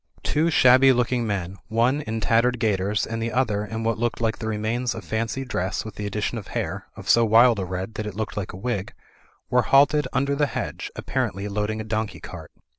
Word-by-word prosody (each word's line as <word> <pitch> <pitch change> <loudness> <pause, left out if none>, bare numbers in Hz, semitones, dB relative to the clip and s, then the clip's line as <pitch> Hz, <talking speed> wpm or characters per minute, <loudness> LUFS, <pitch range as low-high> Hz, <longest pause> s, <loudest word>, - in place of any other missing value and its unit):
Two 160 +3 +1
shabby 130 -3 +6
looking 125 -1 +1
men, 95 -2 -3
one 120 +5 +2
in 110 -4 -3
tattered 120 +3 +2
gaiters 105 -1 +1
and 115 0 -4
the 115 +1 -2
other 110 -4 0
in 110 +1 -5
what 115 -1 0
looked 120 0 -1
like 115 -1 -1
the 110 - -4
remains 110 +3 -1
of - - -7
fancy 115 +4 -2
dress 95 -6 -2
with 110 - -7
the 105 0 -5
addition 105 +3 -2
of 100 - -11
hair, - - -4
of - - -10
so 115 - +5
wild 115 0 +5
a 95 - -2
red 95 +4 -5
that 105 0 -4
it 105 - -6
looked 110 0 -4
like 105 -3 -4
a - - -9
wig, 100 -2 -3 0.6
were - - +5
halted 145 +2 +4
under 140 +1 +1
the 145 +1 +1
hedge, - - -4
appar 130 -3 -1
ently 100 +1 -6
loading 105 +1 -2
a - - -3
donkey 110 -1 -3
cart. - - -10
110 Hz, 220 wpm, -24 LUFS, 105-125 Hz, 0.6 s, shabby